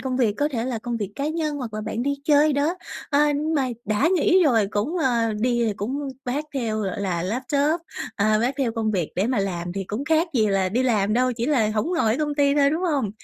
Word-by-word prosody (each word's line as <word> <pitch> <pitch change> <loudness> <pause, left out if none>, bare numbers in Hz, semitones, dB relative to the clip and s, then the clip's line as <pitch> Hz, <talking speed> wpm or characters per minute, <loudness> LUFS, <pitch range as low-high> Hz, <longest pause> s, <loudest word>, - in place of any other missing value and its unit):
công 255 0 -2
việc, 230 -5 +2
có 290 +1 +1
thể 235 -5 -3
là 250 -3 -2
công 240 +1 -4
việc 205 -2 -4
cá 285 +2 -1
nhân 310 -2 -2
hoặc 240 -6 -5
là 215 - -3
bạn 220 +2 -3
đi 280 +1 0
chơi 295 0 +4
đó. 290 +5 +1 0.4
À, 295 +1 +3
nhưng 305 +3 -1
mà 265 -3 +1 0.2
đã 215 +9 +2
nghỉ 370 +1 +4
rồi 225 -8 +3
cũng, 220 - -1
ờ 235 -6 +1
đi 235 -2 +1
cũng 275 +7 -3 0.2
vác 270 +5 -2
theo, 220 -4 -1
gọi 195 0 -3
là, 180 -4 -1
laptop, 280 - 0 0.4
à, 215 +1 +3
vác 245 +4 0
theo 250 -5 0
công 225 -2 -1
việc 180 -6 -2
để 195 +4 +1
mà 250 -4 0
làm 175 -3 -2
thì 195 +1 -4
cũng 215 +9 -4
khác 320 +3 +2
gì 220 -3 +3
là 195 -2 +1
đi 240 +7 0
làm 215 -5 +1
đâu, 250 +2 +2
chỉ 235 +1 -3
là 235 -8 +2
hổng 220 +12 -1
ở 330 - +1
ngồi 220 - +2
công 295 -1 -1
ty 285 -1 +3
thôi, 280 -1 +4
đúng 325 +4 -1
hông? 280 - 0
250 Hz, 255 wpm, -23 LUFS, 215-290 Hz, 0.4 s, chơi